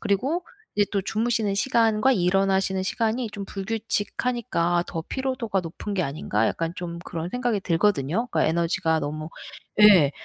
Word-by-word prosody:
그리고 260 - 0 0.3
이제 205 -1 +3
또 200 - 0
'주무시는 220 -1 0
시간과 225 +2 +3
일어나시는 190 0 +2
시간이 225 +4 -1
좀 200 -1 -6
불규칙하니까 205 -3 -1
더 165 - -4
피로도가 255 -7 -1
높은 180 +4 -6
게 185 - +1
아닌가?' 115 -6 -1
약간 165 0 -2
좀 170 -1 -5
그런 170 -1 -5
생각이 245 -2 -1
들거든요. 180 - +1
그러니까 - - +2
에너지가 165 0 +1
너무 155 +2 -4 0.5
예. 190 -9 +8
195 Hz, 365 characters per minute, -25 LUFS, 170-225 Hz, 0.5 s, 예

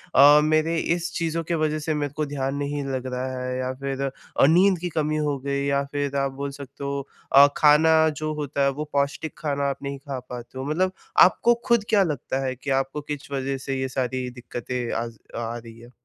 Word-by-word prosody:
अ, 145 +2 +9
मेरे 155 +2 +2 0.2
इस 175 0 -4
चीज़ों 165 0 -1
की 165 - -3
वजह 155 -1 0
से 155 +1 -1
मेरे 145 -2 -2
को 155 - -1
ध्यान 135 -1 -2
नहीं 145 0 -2
लग 130 -2 -3
रहा 130 0 -3
है 125 0 -3
या 130 0 -2
फ़िर 135 +1 -4
द 135 - -2 0.3
अ, - - +7
नींद 180 +3 +5
की 175 +1 -3
कमी 155 -1 -1
हो 145 -1 0
गई 140 +1 -2
या 140 0 +1
फ़िर 145 -1 -2
आप 135 0 0
बोल 140 +1 -5
सकते 140 0 -10
हो 140 0 -3 0.2
अ, 140 +1 +9
ख़ाना 160 +1 +6
जो 155 0 -3
होता 145 -2 -3
है 140 - +4
वो - - 0
पौष्टिक 140 +2 -1
ख़ाना 140 -1 0
आप 140 - -5
नहीं 140 0 -4
ख़ा 140 -1 -5
पाते 125 +1 -8
हो। 130 - -4
मतलब 180 +6 +1 0.4
आपको 235 +5 +2
ख़ुद 235 -3 +4
क्या 205 -3 +5
लगता 145 -5 -2
है 130 0 -2
कि 130 +3 -7
आपको 135 +2 -4
किस 145 -1 -7
वजह 135 0 -2
से 135 0 -3
ये 130 - -1
सारी 130 0 -2
दिक़्क़तें 125 0 -5
आज 115 0 -4 0.2
आ 115 0 -3
रही 115 -1 -12
हैं। 120 +1 -14
140 Hz, 225 wpm, -24 LUFS, 130-155 Hz, 0.4 s, अ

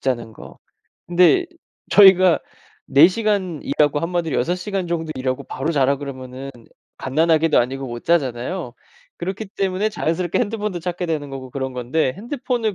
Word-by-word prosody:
자는 120 -4 -2
거. - - -13 0.5
근데 180 - +4 0.5
저희가 185 -3 +7 0.5
"4 145 +5 +7
시간 190 -6 -1
일하고 145 -1 +1
한마디로 165 -2 -1
6 170 +9 0
시간 190 0 -3
정도 165 -2 -3
일하고 130 0 -2
바로 140 +5 -3
자라." 140 -2 +2
그러면은 135 -1 -7 0.5
갓난 155 +5 0
아기도 160 -1 +4
아니고 135 +3 -1
못 120 -1 -7
자잖아요. 135 -1 -1 0.5
그렇기 190 +5 -4
때문에 195 +2 0
자연스럽게 175 -4 -1
핸드폰도 210 -5 -2
찾게 180 +1 -3
되는 150 -3 -2
거고 130 -1 -8
그런 130 0 -4
건데 125 +3 -1
핸드폰을 235 -1 -2
165 Hz, 350 characters per minute, -21 LUFS, 135-185 Hz, 0.5 s, 저희가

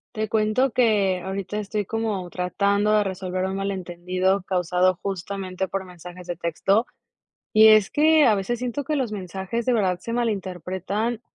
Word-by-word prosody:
Te 215 0 -2
cuento 220 +4 +2
que 205 -6 +2
ahorita 195 +1 -4
estoy 210 0 -2
como 215 -5 -2
tratando 200 +4 0
de 210 - +4
resolver 185 -1 -3
un 190 0 -3
malentendido 185 0 -1
causado 180 -1 +1
justamente 190 0 -4
por 195 +1 -4
mensajes 180 0 -11
de 175 - -3
texto, 185 +7 +1 0.7
y 215 0 +7
es 215 -2 +6
que, 310 +1 +4
a 225 - +5
veces 205 +4 -2
siento 250 +3 -3
que 305 +1 -1
los 255 -6 -1
mensajes 195 +4 -4
de 250 - +3
verdad 190 -5 +1
se 230 +5 -5
malinterpretan 200 0 -2
195 Hz, 160 wpm, -24 LUFS, 185-220 Hz, 0.7 s, y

